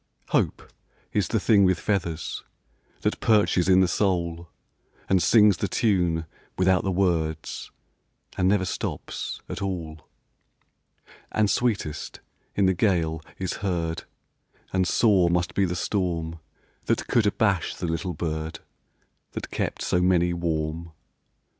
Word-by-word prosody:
Hope -, -, 0 dB, 0.4 s
is 100 Hz, -5 st, +1 dB
the 110 Hz, -, +1 dB
thing 100 Hz, 0 st, +4 dB
with 90 Hz, -3 st, +3 dB
feathers 85 Hz, -6 st, -2 dB, 0.6 s
That -, -, 0 dB
perches 105 Hz, -5 st, +3 dB
in 95 Hz, 0 st, +6 dB
the 95 Hz, -, +4 dB
soul, 85 Hz, -3 st, -1 dB, 0.6 s
And 95 Hz, -2 st, +3 dB
sings 105 Hz, -3 st, +5 dB
the -, -, -1 dB
tune 90 Hz, -7 st, +1 dB, 0.3 s
without 95 Hz, -1 st, +3 dB
the 95 Hz, -, 0 dB
words, 85 Hz, -4 st, -1 dB, 0.7 s
And 90 Hz, -, +1 dB
never 95 Hz, -1 st, +3 dB
stops -, -, -4 dB
at -, -, -6 dB
all, 80 Hz, -5 st, -5 dB, 1.2 s
And 105 Hz, -1 st, +2 dB
sweetest 105 Hz, -11 st, -1 dB, 0.4 s
in 100 Hz, -, +3 dB
the 95 Hz, -, +4 dB
gale 85 Hz, -5 st, +1 dB, 0.2 s
is 95 Hz, -1 st, -3 dB
heard; 85 Hz, -4 st, -2 dB, 0.7 s
And 95 Hz, -1 st, +2 dB
sore 95 Hz, -6 st, +4 dB
must 85 Hz, +1 st, 0 dB
be 100 Hz, -, +2 dB
the 90 Hz, 0 st, -2 dB
storm 85 Hz, -4 st, -2 dB, 0.5 s
That -, -, 0 dB
could 115 Hz, -3 st, +2 dB
abash 100 Hz, -4 st, +1 dB
the -, -, -4 dB
little 85 Hz, +1 st, -2 dB
bird 80 Hz, -1 st, -3 dB, 0.7 s
That -, -, -6 dB
kept -, -, -2 dB
so 90 Hz, -, +1 dB
many 90 Hz, -1 st, +3 dB
warm. 80 Hz, -1 st, -2 dB
90 Hz, 130 wpm, -25 LUFS, 85-95 Hz, 1.2 s, in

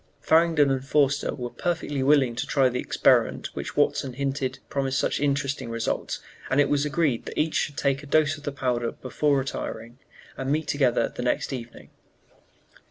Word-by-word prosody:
Farrington 160 Hz, -3 st, +4 dB
and 130 Hz, -1 st, -1 dB
Forster 140 Hz, 0 st, +1 dB
were 125 Hz, -3 st, -5 dB
perfectly 160 Hz, -5 st, -2 dB
willing 135 Hz, -3 st, +3 dB
to 125 Hz, +4 st, -3 dB
try 135 Hz, -2 st, +3 dB
the 125 Hz, 0 st, -3 dB
experiment -, -, +2 dB
which -, -, -6 dB
Watson 130 Hz, -2 st, +1 dB
hinted 135 Hz, -1 st, -2 dB
promised 135 Hz, -1 st, -1 dB
such -, -, 0 dB
interesting 140 Hz, -2 st, -1 dB
results, 115 Hz, 0 st, -2 dB, 0.3 s
and 135 Hz, -, +2 dB
it 145 Hz, -, +4 dB
was 145 Hz, 0 st, +2 dB
agreed 150 Hz, -5 st, 0 dB
that -, -, -7 dB
each 155 Hz, +1 st, +1 dB
should 145 Hz, -, -1 dB
take 140 Hz, -1 st, +1 dB
a 145 Hz, -, -11 dB
dose 155 Hz, +1 st, +3 dB
of 150 Hz, -, -12 dB
the 145 Hz, -, -3 dB
powder 125 Hz, -4 st, -1 dB
before 140 Hz, +3 st, 0 dB
retiring, 120 Hz, -2 st, -5 dB, 0.4 s
and 135 Hz, +1 st, -3 dB
meet 155 Hz, +1 st, 0 dB
together 125 Hz, -5 st, +1 dB
the -, -, -4 dB
next 125 Hz, +2 st, -1 dB
evening. 120 Hz, -2 st, -8 dB
140 Hz, 175 wpm, -25 LUFS, 130-145 Hz, 0.4 s, Farrington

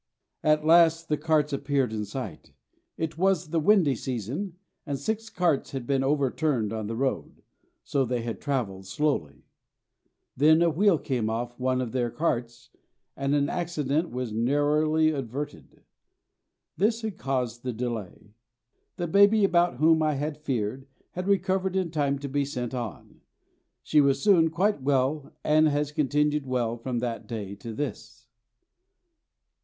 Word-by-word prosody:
At 155 Hz, 0 st, +2 dB
last 165 Hz, 0 st, +5 dB
the 150 Hz, -, +2 dB
carts 150 Hz, -1 st, +1 dB
appeared 140 Hz, -4 st, 0 dB
in 105 Hz, -1 st, -2 dB
sight. 105 Hz, -, -7 dB, 0.4 s
It 160 Hz, -1 st, -4 dB
was 185 Hz, -3 st, +2 dB
the 165 Hz, -, +2 dB
windy 180 Hz, -4 st, +4 dB
season, 130 Hz, -, -4 dB, 0.3 s
and 140 Hz, -3 st, -3 dB
six 220 Hz, +7 st, -3 dB
carts 170 Hz, -10 st, 0 dB
had 130 Hz, -3 st, -4 dB
been 135 Hz, +1 st, +1 dB
overturned 135 Hz, -4 st, 0 dB
on 110 Hz, -2 st, -3 dB
the 115 Hz, -, -4 dB
road, 130 Hz, +2 st, -3 dB, 0.4 s
so 140 Hz, -, 0 dB
they 125 Hz, -2 st, -2 dB
had 115 Hz, -1 st, -5 dB
travelled 105 Hz, -10 st, -2 dB
slowly. 95 Hz, -, -1 dB, 0.9 s
Then 155 Hz, +4 st, +5 dB
a 170 Hz, -, +3 dB
wheel 195 Hz, +2 st, +3 dB
came 125 Hz, -7 st, -2 dB
off 120 Hz, +2 st, -4 dB
one 130 Hz, 0 st, +1 dB
of 120 Hz, -3 st, -4 dB
their 125 Hz, -2 st, 0 dB
carts 120 Hz, -4 st, -3 dB, 0.4 s
and 140 Hz, +1 st, 0 dB
an 145 Hz, -1 st, +2 dB
accident 160 Hz, -2 st, -1 dB
was 125 Hz, -2 st, -4 dB
narrowly 150 Hz, +6 st, +2 dB
averted. 130 Hz, -, -6 dB, 0.9 s
This 220 Hz, +5 st, +1 dB
had 215 Hz, -5 st, -4 dB
caused 125 Hz, -3 st, -2 dB
the 125 Hz, -, -3 dB
delay. 110 Hz, -3 st, -5 dB, 0.6 s
The 175 Hz, -, -2 dB
baby 200 Hz, +5 st, +5 dB
about 175 Hz, -4 st, +3 dB
whom 160 Hz, +3 st, +4 dB
I 155 Hz, -1 st, +1 dB
had 150 Hz, +2 st, -3 dB
feared 130 Hz, -2 st, -3 dB, 0.2 s
had 180 Hz, +1 st, -5 dB
recovered 190 Hz, -1 st, +1 dB
in 185 Hz, -3 st, 0 dB
time 140 Hz, -3 st, 0 dB
to 140 Hz, +1 st, -6 dB
be 140 Hz, +1 st, 0 dB
sent 125 Hz, -3 st, -4 dB
on. 120 Hz, -8 st, -7 dB, 0.6 s
She 150 Hz, -, +4 dB
was 140 Hz, -1 st, +2 dB
soon 180 Hz, -6 st, +4 dB
quite 185 Hz, +2 st, 0 dB
well, 135 Hz, +2 st, 0 dB
and 155 Hz, +1 st, +4 dB
has 145 Hz, 0 st, 0 dB
continued 150 Hz, 0 st, +1 dB
well 120 Hz, -3 st, 0 dB
from 120 Hz, +1 st, -4 dB
that 120 Hz, -2 st, -4 dB
day 105 Hz, -4 st, -5 dB
to 115 Hz, -, -7 dB
this. 145 Hz, +7 st, -6 dB
140 Hz, 150 wpm, -27 LUFS, 125-160 Hz, 0.9 s, last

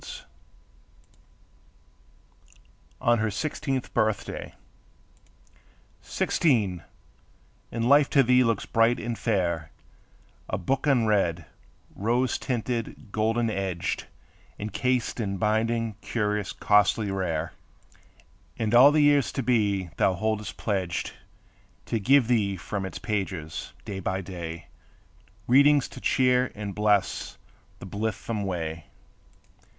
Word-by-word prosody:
TO -, -, -12 dB
ANNA -, -, -14 dB, 2.8 s
ON 120 Hz, 0 st, +3 dB
HER 110 Hz, 0 st, +1 dB
SIXTEENTH 135 Hz, +3 st, -3 dB
BIRTHDAY 110 Hz, -3 st, -1 dB, 1.5 s
Sixteen! 105 Hz, -, +1 dB, 0.9 s
and 115 Hz, 0 st, -1 dB
life 140 Hz, +1 st, +5 dB
to 140 Hz, -, +5 dB
thee 125 Hz, +1 st, +4 dB
looks 115 Hz, -4 st, 0 dB
bright 115 Hz, +2 st, +2 dB
and 120 Hz, 0 st, -3 dB
fair; 85 Hz, -9 st, -1 dB, 0.8 s
A 95 Hz, -, -1 dB
book 130 Hz, -, -1 dB
unread, 105 Hz, -, +2 dB, 0.5 s
rose 120 Hz, +5 st, 0 dB
tinted, 120 Hz, -2 st, -3 dB
golden 115 Hz, +2 st, +1 dB
edged, 95 Hz, -4 st, -3 dB, 0.5 s
Encased 125 Hz, +5 st, -1 dB
in 100 Hz, -3 st, -2 dB
binding 110 Hz, +2 st, 0 dB
curious, 105 Hz, -3 st, -1 dB
costly, 105 Hz, 0 st, +2 dB
rare; 85 Hz, -4 st, -2 dB, 1.0 s
And 110 Hz, 0 st, -1 dB
all 130 Hz, +4 st, +8 dB
the 150 Hz, 0 st, +3 dB
years 145 Hz, -2 st, +4 dB
to 135 Hz, -, -2 dB
be 100 Hz, -7 st, +1 dB
thou 95 Hz, -, +2 dB
holdest 110 Hz, +2 st, -2 dB
pledged 95 Hz, -6 st, -2 dB, 0.7 s
To 115 Hz, -, -1 dB
give 130 Hz, +3 st, +4 dB
thee 105 Hz, -6 st, +1 dB
from 95 Hz, +2 st, -4 dB
its -, -, -7 dB
pages, 95 Hz, -7 st, -4 dB
day 100 Hz, -2 st, -5 dB
by 95 Hz, 0 st, -2 dB
day, 85 Hz, -3 st, -7 dB, 0.8 s
Readings 140 Hz, +3 st, +5 dB
to -, -, -11 dB
cheer 125 Hz, -1 st, +2 dB
and 105 Hz, -1 st, -5 dB
bless 105 Hz, -2 st, 0 dB, 0.4 s
the -, -, -10 dB
blithesome 105 Hz, +1 st, -3 dB
way. 85 Hz, -3 st, -4 dB
110 Hz, 110 wpm, -26 LUFS, 95-120 Hz, 2.8 s, all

